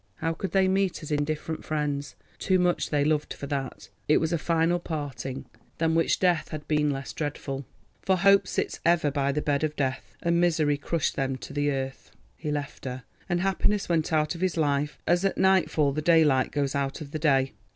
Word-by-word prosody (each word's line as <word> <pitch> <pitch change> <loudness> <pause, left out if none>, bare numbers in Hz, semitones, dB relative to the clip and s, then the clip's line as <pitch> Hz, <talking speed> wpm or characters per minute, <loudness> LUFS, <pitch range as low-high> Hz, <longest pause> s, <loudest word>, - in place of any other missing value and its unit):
How 165 +1 -1
could 190 +3 -4
they 190 +1 +3
meet 190 -3 0
as 155 - -7
indifferent 150 +2 -2
friends? 145 -2 -2 0.2
Too 185 - +2
much 180 -1 +1
they 145 -1 +1
loved 150 0 0
for - - -7
that. 135 -2 -4 0.2
It 150 - +5
was 160 +1 0
a 170 - +1
final 165 +2 +1
parting, 135 -5 -5 0.3
than 160 0 +1
which 165 0 +2
death 180 -4 +2
had 155 -1 -7
been 150 -1 +2
less 135 -1 -4
dreadful—for 145 +5 -4
Hope 195 +1 +5
sits - - -2
ever 165 -4 +3
by 140 -1 0
the 150 +2 -2
bed 145 0 0
of 155 -1 -1
death—and 145 +5 -1
misery 155 -4 +2
crushed 155 +2 -1
them 135 -1 -1
to 130 - -9
the 145 0 +1
earth. 135 -1 -4 0.3
He 155 - -5
left 145 -1 -4
her, 125 -1 -5 0.3
and 175 -1 +1
happiness 195 +2 +1
went 165 -2 +1
out 155 0 +2
of 170 - -9
his 185 -2 0
life 145 -1 0
as 175 +2 +2
at 195 - 0
nightfall 185 -6 +3
the 155 +2 -2
daylight 150 -5 +4
goes 140 -2 -1
out 140 +2 -2
of 140 -2 -8
the 155 - -3
day. 135 -4 +2
150 Hz, 200 wpm, -27 LUFS, 140-170 Hz, 0.3 s, It